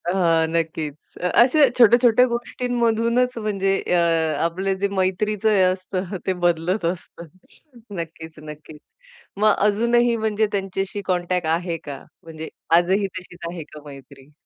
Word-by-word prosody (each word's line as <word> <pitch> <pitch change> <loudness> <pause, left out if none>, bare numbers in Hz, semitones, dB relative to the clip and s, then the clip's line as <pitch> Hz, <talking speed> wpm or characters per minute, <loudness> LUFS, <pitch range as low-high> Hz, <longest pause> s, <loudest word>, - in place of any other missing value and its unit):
अहां, 165 -3 +2
नक्कीच. 160 -3 -2 0.3
अ, 180 - 0
अशा 275 +4 +5
छोट्या-छोट्या 240 +1 +6
गोष्टींमधूनच 240 0 0
म्हणजे 195 -3 -1
अ, 180 - +1 0.4
आपलं 185 +4 -1
जे 200 - +2
मैत्रीचं 205 +3 0
हे 205 -3 +3
असतं 185 +1 -2
ते 190 - +1
बदलत 175 +3 0
असतं. 170 0 -5 0.7
नक्कीच 160 -1 -7
नक्कीच, 150 0 -11 0.6
मग 215 0 +4
अजूनही 235 +3 +2
म्हणजे 220 -1 0
त्यांच्याशी 195 0 -3
कॉन्टॅक्ट 180 -1 -1
आहे 170 -1 -3
का? 140 -2 -7 0.2
म्हणजे 160 -1 -8 0.3
आजही 190 +3 +1
तशीच 180 -1 -10
आहे 170 -1 -7
का 150 - -11
मैत्री? 140 0 -14
185 Hz, 130 wpm, -22 LUFS, 165-215 Hz, 0.7 s, छोट्या-छोट्या